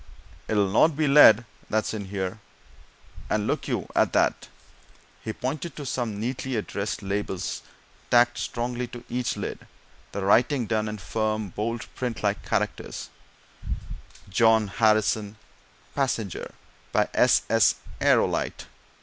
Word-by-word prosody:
it'll 105 -2 +2
not 140 +11 +4
be 155 -1 +2
lead 120 -5 +8 0.2
that's 110 0 0
in 105 -2 -4
here! 95 +1 -4 0.9
And 105 -1 +1
look - - -1
you - - -2
at - - +3
that!" - - +2 0.8
He 110 - -3
pointed 140 +7 -4
to 145 - -6
some 120 -5 -2
neatly 125 +3 -3
addressed 105 -1 -3
labels 95 -2 -3 0.5
tacked 120 0 +4
strongly 120 +1 -3
to 120 0 -10
each 125 0 -1
lid - - -5 0.4
the 100 - -3
writing 120 +5 +3
done 110 0 0
in 105 0 -4
firm, 110 +1 -2
bold, 115 +4 -3
print 125 -4 -4
like 100 0 0
characters: - - -3 1.2
_John 110 +1 +4
Harrison, 110 0 +2 0.6
passenger, 115 - -2 0.4
by - - +2
S.S. - - +4 0.3
Aerolite. - - +2
110 Hz, 125 wpm, -26 LUFS, 105-125 Hz, 1.2 s, lead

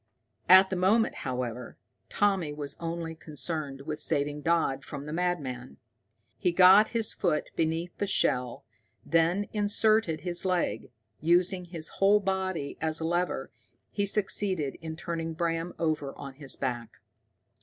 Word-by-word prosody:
At 190 +1 +8
the - - 0
moment, 200 +5 +3 0.2
however, 125 -1 -4 0.3
Tommy 195 -7 +1
was 145 -1 -4
only 165 -1 -4
concerned 150 -2 -3
with 150 +2 -5
saving 145 0 -1
Dodd 155 -5 +1
from 140 +2 -7
the 150 - -6
madman. 150 -8 -3 0.6
He 180 - +2
got 190 +4 +7
his 230 -3 0
foot 170 -5 -1
beneath 165 +2 -1
the 205 - 0
shell, 125 - 0 0.4
then 170 +5 +2
inserted 210 -4 +2
his 175 -1 0
leg; 185 -2 -1 0.3
using 180 +3 +2
his 165 -2 -7
whole 200 +2 +5
body 190 -6 -2
as 160 -1 -1
a 160 - -3
lever, 175 +2 -1 0.4
he 200 -1 -1
succeeded 190 -7 +1
in 160 -1 -6
turning 165 0 -4
Bram 165 0 -2
over 155 -4 -2
on 140 -1 -8
his 135 0 -5
back. 120 -4 -4
165 Hz, 140 wpm, -28 LUFS, 150-185 Hz, 0.6 s, At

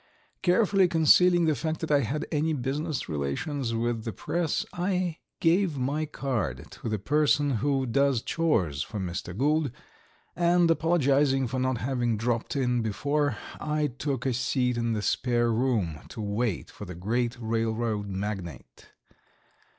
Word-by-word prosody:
Carefully 190 +1 +4
concealing 175 +1 +5
the 155 - +3
fact 160 +2 -2
that 160 - -2
I 145 - +5
had 145 +2 -2
any 155 +1 +1
business 145 +3 -2
relations 115 - -2
with 115 -1 -1
the 115 - -3
press, 165 - -1
I 180 -2 -1 0.2
gave 170 -2 +2
my 145 +4 -1
card 110 - -3
to - - -6
the 110 - 0
person 145 +3 +2
who 135 -2 +1
does 135 0 +2
chores 95 - 0
for 105 - -4
Mr. 90 0 -4
Gould, 150 +3 +2 0.7
and, 175 -1 +4
apologizing 145 -5 +2
for 130 +2 -2
not 130 -1 0
having 120 -2 0
dropped 115 +3 -1
in 125 -3 +1
before, 140 +5 0 0.2
I 150 -1 -1
took 135 -4 -2
a 130 - +1
seat 125 0 0
in 115 -1 0
the 105 -2 -2
spare 120 0 +1
room 110 - 0
to - - -9
wait 105 -1 -2
for 105 - -9
the 90 -2 -8
great 115 +7 -1
railroad 110 -2 -1
magnate. 95 - -6
130 Hz, 150 wpm, -27 LUFS, 110-150 Hz, 0.7 s, concealing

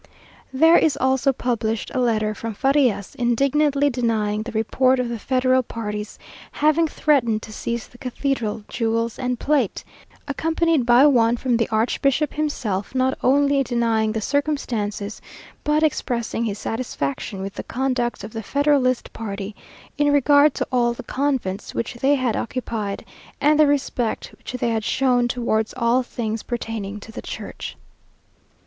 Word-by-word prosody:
There 320 +6 +6
is 295 -4 +2
also 265 +1 +2
published 230 -4 -2
a 260 - 0
letter 215 -3 +1
from 225 0 -6
Farias, 270 -6 +1
indignantly 275 +4 +2
denying 220 -4 0
the 235 +2 -6
report 255 +4 +2
of 250 -1 -1
the 235 -1 -4
federal 255 +2 +2
party's 210 -3 -5 0.4
having 310 +2 +3
threatened 245 -8 +1
to 215 - -9
seize 235 +1 -3
the 245 - -19
cathedral 245 -4 -2
jewels 230 -1 -1
and 250 -1 -1
plate; 280 -8 0 0.4
accompanied 320 -1 +1
by 245 +3 +7
one 240 -4 +4
from 250 0 0
the 230 -1 0
archbishop 265 +6 +1
himself, 250 -9 -2
not 260 0 +2
only 280 +1 +3
denying 230 -4 +1
the 220 0 -2
circumstances, 225 -7 -2 0.4
but 300 +1 +2
expressing 235 -6 -1
his 210 -2 -2
satisfaction 195 - -3
with 195 +1 -5
the - - -5
conduct 250 -4 -2
of 210 - -8
the 225 - -4
federalist 280 0 +1
party 205 -2 -5 0.4
in 290 0 +4
regard 285 +1 +5
to - - -1
all 240 -2 +2
the - - -8
convents 260 -9 -2
which 230 - -2
they 270 +4 +2
had 255 -5 0
occupied, 225 -5 -3 0.3
and 300 +1 +3
the 305 - +7
respect 265 -5 -1
which - - -9
they 245 -1 -1
had 225 -1 -1
shown 250 0 +2
towards 230 -3 -1
all 235 +1 +3
thing's 225 -3 -4
pertaining 220 -4 -4
to 225 - -11
the - - -7
church. - - -7
245 Hz, 150 wpm, -22 LUFS, 220-275 Hz, 0.4 s, by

